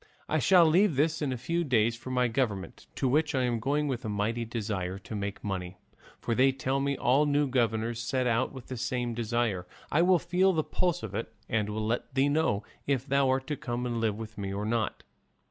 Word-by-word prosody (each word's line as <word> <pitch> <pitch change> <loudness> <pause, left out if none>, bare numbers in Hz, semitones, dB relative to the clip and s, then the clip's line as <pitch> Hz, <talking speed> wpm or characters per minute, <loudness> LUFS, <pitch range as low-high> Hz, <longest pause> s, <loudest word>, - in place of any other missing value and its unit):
I - - +1
shall 180 -3 +6
leave 170 +2 +4
this 155 +3 +1
in 145 -3 0
a 130 - -2
few 170 +8 -1
days 115 -5 +2
for 120 +2 -9
my 125 -1 +2
government, 110 -6 -2
to 135 - 0
which 150 +3 +2
I 130 - +2
am 120 -2 0
going 145 +5 0
with 130 -2 -3
a 110 - -3
mighty 110 +3 -1
great - - -15
desire 100 -5 -3
to 100 +3 -8
make 100 0 -4
money, 95 -2 -4 0.4
for 115 - -1
they 130 +3 +4
tell 135 +1 -1
me 140 0 0
all 140 +5 +3
new 145 0 +2
governors 115 -2 0
set 130 +2 -1
out 120 +1 +1
with 130 -3 -10
the 130 - -6
same 120 0 -2
desire; 115 -5 -1 0.2
I 155 - +4
will 180 +1 +5
feel 180 +3 +2
the 160 -2 +1
pulse 175 -6 -1
of 105 -3 -6
it 110 +3 -3 0.2
and 105 -2 0
will 110 +1 -2
let 120 +4 -2
thee 135 +2 +3
know 145 -9 +1 0.2
if 135 -2 +1
thou 140 -1 +2
art 130 0 +1
to 150 - -2
come 120 -2 -3
and 120 -2 -2
live 110 -2 0
with 110 -1 -8
me 100 -1 -3
or 100 +2 -3
not. 110 -1 -1
125 Hz, 230 wpm, -29 LUFS, 110-140 Hz, 0.4 s, shall